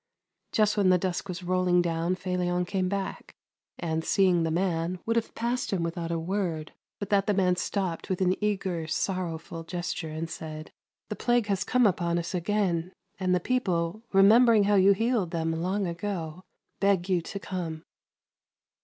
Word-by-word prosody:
Just 210 Hz, -1 st, +2 dB
when 200 Hz, -2 st, +4 dB
the 185 Hz, -, +6 dB
dusk 185 Hz, +1 st, -3 dB
was 180 Hz, 0 st, -5 dB
rolling 180 Hz, 0 st, +2 dB
down, 170 Hz, +1 st, 0 dB
Felion 180 Hz, -1 st, -1 dB
came 185 Hz, 0 st, -1 dB
back, 195 Hz, -1 st, -4 dB, 0.4 s
and, 160 Hz, -1 st, -2 dB
see 195 Hz, -, +3 dB
ing 180 Hz, -2 st, +3 dB
the 165 Hz, -, 0 dB
man, 170 Hz, 0 st, 0 dB
would 230 Hz, -, 0 dB
have 230 Hz, -1 st, -1 dB
passed 240 Hz, +2 st, -1 dB
him 185 Hz, -4 st, 0 dB
without 170 Hz, 0 st, -3 dB
a 170 Hz, -, -1 dB
word, 165 Hz, -2 st, -2 dB, 0.2 s
but 200 Hz, 0 st, -6 dB
that 200 Hz, -1 st, +3 dB
the 205 Hz, -, +2 dB
man 180 Hz, -2 st, +3 dB
stopped 185 Hz, -2 st, -2 dB
with 185 Hz, -, -1 dB
an 185 Hz, -1 st, +3 dB
eager, 190 Hz, -6 st, -1 dB
sorrowful 165 Hz, -2 st, -3 dB
gesture 175 Hz, -1 st, -4 dB
and 160 Hz, +2 st, -4 dB
said: 155 Hz, -1 st, -7 dB, 0.2 s
" -, -, -58 dB
The -, -, -3 dB
plague 240 Hz, -2 st, +1 dB
has 200 Hz, -2 st, 0 dB
come 250 Hz, -1 st, +3 dB
upon 170 Hz, -3 st, +1 dB
us 170 Hz, +1 st, -3 dB
again, 180 Hz, -1 st, 0 dB, 0.3 s
and 185 Hz, -1 st, +2 dB
the -, -, +2 dB
people, 185 Hz, -4 st, -1 dB
remembering 215 Hz, +3 st, +6 dB
how 205 Hz, +1 st, +2 dB
you 195 Hz, 0 st, +6 dB
healed 225 Hz, -3 st, 0 dB
them 165 Hz, -1 st, -1 dB
long 185 Hz, +5 st, -1 dB
ago, 170 Hz, -2 st, -4 dB, 0.4 s
beg 195 Hz, -3 st, +2 dB
you 185 Hz, -3 st, +2 dB
to 200 Hz, +4 st, -6 dB
come." 170 Hz, -5 st, -5 dB
180 Hz, 180 wpm, -28 LUFS, 170-200 Hz, 0.4 s, the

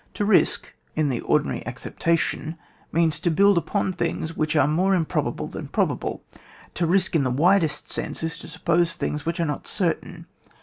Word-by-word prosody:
To 205 Hz, -, 0 dB
risk, 200 Hz, -2 st, +2 dB, 0.2 s
in 155 Hz, -2 st, +1 dB
the 125 Hz, -3 st, -1 dB
ordinary -, -, +1 dB
accepta 170 Hz, 0 st, 0 dB
tion, 160 Hz, +1 st, -3 dB, 0.3 s
means 165 Hz, -2 st, +2 dB
to 170 Hz, -, +1 dB
build 200 Hz, +5 st, +5 dB
upon 185 Hz, +3 st, 0 dB
things 165 Hz, -2 st, -2 dB
which 155 Hz, +1 st, 0 dB
are 145 Hz, -, +4 dB
more 185 Hz, +6 st, +2 dB
improbable 165 Hz, -4 st, -1 dB
than -, -, -7 dB
probable. -, -, -1 dB, 0.5 s
To 170 Hz, -, 0 dB
risk 185 Hz, +1 st, +2 dB
in 150 Hz, -, +4 dB
the 130 Hz, -, +1 dB
widest 160 Hz, +3 st, +2 dB
sense, -, -, -4 dB
is 160 Hz, -, -3 dB
to -, -, -9 dB
suppose 170 Hz, 0 st, +1 dB
things 150 Hz, +1 st, -3 dB
which 170 Hz, 0 st, -1 dB
are 170 Hz, -, +2 dB
not 145 Hz, -2 st, -4 dB
certain. -, -, -2 dB
165 Hz, 180 wpm, -24 LUFS, 155-175 Hz, 0.5 s, build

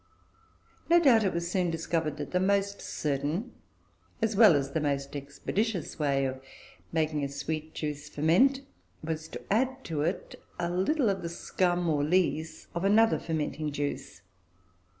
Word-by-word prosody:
No 345 Hz, +1 st, +7 dB
doubt 250 Hz, -9 st, +5 dB
it 190 Hz, -, +1 dB
was 170 Hz, +1 st, -3 dB
soon 180 Hz, -2 st, +1 dB
discovered 165 Hz, -2 st, -1 dB
that 145 Hz, -, -6 dB
the 180 Hz, -, +2 dB
most 200 Hz, +1 st, +1 dB
certain, 150 Hz, -, -2 dB, 0.7 s
as 225 Hz, -2 st, 0 dB
well 210 Hz, -6 st, +7 dB
as 140 Hz, -1 st, -1 dB
the 160 Hz, -, 0 dB
most 140 Hz, -1 st, -2 dB
expeditious, 165 Hz, -, -3 dB
way 140 Hz, -2 st, +1 dB
of 130 Hz, 0 st, -4 dB, 0.5 s
making 155 Hz, -2 st, 0 dB
a 140 Hz, -, -1 dB
sweet 155 Hz, +2 st, -4 dB
juice 150 Hz, 0 st, -4 dB
ferment 190 Hz, -, +3 dB, 0.4 s
was 160 Hz, 0 st, -3 dB
to -, -, -5 dB
add 260 Hz, +4 st, 0 dB
to 155 Hz, -3 st, -3 dB
it 170 Hz, +5 st, -3 dB, 0.2 s
a 170 Hz, 0 st, -1 dB
little 230 Hz, -, +1 dB
of 195 Hz, -, -3 dB
the 170 Hz, -, -4 dB
scum, 175 Hz, +1 st, 0 dB
or 150 Hz, -3 st, +1 dB
lees, 160 Hz, -1 st, 0 dB
of 170 Hz, -, -3 dB
another 220 Hz, +3 st, +4 dB
fermenting 155 Hz, -1 st, -2 dB
juice. 140 Hz, -9 st, -4 dB
165 Hz, 155 wpm, -29 LUFS, 150-195 Hz, 0.7 s, No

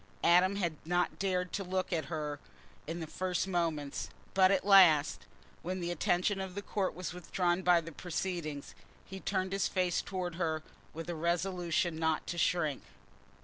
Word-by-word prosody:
Adam 180 Hz, +3 st, +5 dB
had 170 Hz, -6 st, -1 dB
not 175 Hz, +2 st, 0 dB
dared 180 Hz, -2 st, -1 dB
to 200 Hz, -, -1 dB
look 185 Hz, 0 st, -2 dB
at 160 Hz, -4 st, 0 dB
her 150 Hz, -1 st, -4 dB, 0.5 s
in 165 Hz, +2 st, -4 dB
the -, -, -3 dB
first 185 Hz, +3 st, -2 dB
moments, 165 Hz, -6 st, -1 dB, 0.2 s
but 190 Hz, -1 st, +6 dB
at 195 Hz, -1 st, +2 dB
last, 175 Hz, -7 st, +6 dB, 0.3 s
when 185 Hz, +2 st, -3 dB
the 175 Hz, 0 st, -2 dB
attention 180 Hz, +4 st, +1 dB
of 190 Hz, -1 st, -6 dB
the 200 Hz, -, -3 dB
court 195 Hz, -2 st, -1 dB
was 180 Hz, -2 st, -5 dB
withdrawn 180 Hz, 0 st, 0 dB
by 180 Hz, -1 st, +5 dB
the 165 Hz, 0 st, -8 dB
proceedings 165 Hz, -3 st, -4 dB, 0.3 s
he 190 Hz, 0 st, -8 dB
turned 190 Hz, -1 st, -1 dB
his 195 Hz, -, +1 dB
face 180 Hz, -2 st, 0 dB
towards 180 Hz, -3 st, -4 dB
her 160 Hz, -3 st, -1 dB, 0.3 s
with 165 Hz, +1 st, -6 dB
a 175 Hz, -, -2 dB
resolution 170 Hz, 0 st, 0 dB
not 160 Hz, -1 st, +1 dB
to 175 Hz, -, -4 dB
shrink. 155 Hz, -7 st, +1 dB
175 Hz, 170 wpm, -32 LUFS, 165-185 Hz, 0.5 s, but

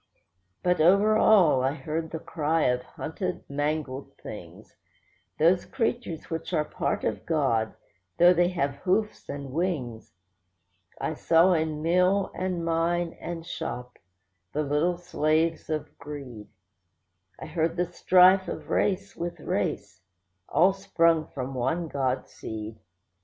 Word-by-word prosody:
But 180 Hz, -2 st, +2 dB
over 200 Hz, +6 st, +5 dB
all 180 Hz, -12 st, +5 dB
I 135 Hz, +1 st, +1 dB
heard 160 Hz, 0 st, -4 dB
the 160 Hz, -, -4 dB
cry 160 Hz, 0 st, -1 dB
of 125 Hz, 0 st, +2 dB
hunted, 180 Hz, +7 st, -5 dB
mangled 145 Hz, -1 st, -3 dB
things; -, -, -10 dB, 0.6 s
Those 175 Hz, +3 st, +4 dB
creatures 235 Hz, -, -3 dB
which 165 Hz, +2 st, -4 dB
are 155 Hz, -2 st, +2 dB
part -, -, -2 dB
of -, -, -2 dB
God, 130 Hz, -9 st, 0 dB, 0.4 s
though 175 Hz, +1 st, +7 dB
they 175 Hz, 0 st, +3 dB
have 140 Hz, -6 st, -1 dB
hoofs 210 Hz, +3 st, -1 dB
and 140 Hz, -2 st, -6 dB
wings. 135 Hz, -, -3 dB, 0.8 s
I -, -, -2 dB
saw 165 Hz, +4 st, +4 dB
in 155 Hz, -2 st, -1 dB
mill, 180 Hz, +4 st, +2 dB
and 180 Hz, -2 st, -2 dB
mine, 165 Hz, +1 st, 0 dB
and 165 Hz, -1 st, -6 dB
shop, 125 Hz, -8 st, -6 dB, 0.5 s
the 150 Hz, -, 0 dB
little 150 Hz, +5 st, +1 dB
slaves 160 Hz, -2 st, 0 dB
of 155 Hz, -1 st, -3 dB
greed; 135 Hz, -7 st, -8 dB, 0.9 s
I -, -, -7 dB
heard 165 Hz, +1 st, -1 dB
the 180 Hz, -, +2 dB
strife 185 Hz, +2 st, +5 dB
of -, -, -6 dB
race 195 Hz, 0 st, 0 dB
with 170 Hz, 0 st, -5 dB
race, -, -, -3 dB, 0.5 s
all 185 Hz, +3 st, +4 dB
sprung 165 Hz, -4 st, +2 dB
from 130 Hz, 0 st, -5 dB
one 135 Hz, +7 st, -1 dB
God 135 Hz, -3 st, -1 dB
seed. 110 Hz, 0 st, -7 dB
165 Hz, 130 wpm, -27 LUFS, 145-180 Hz, 0.9 s, though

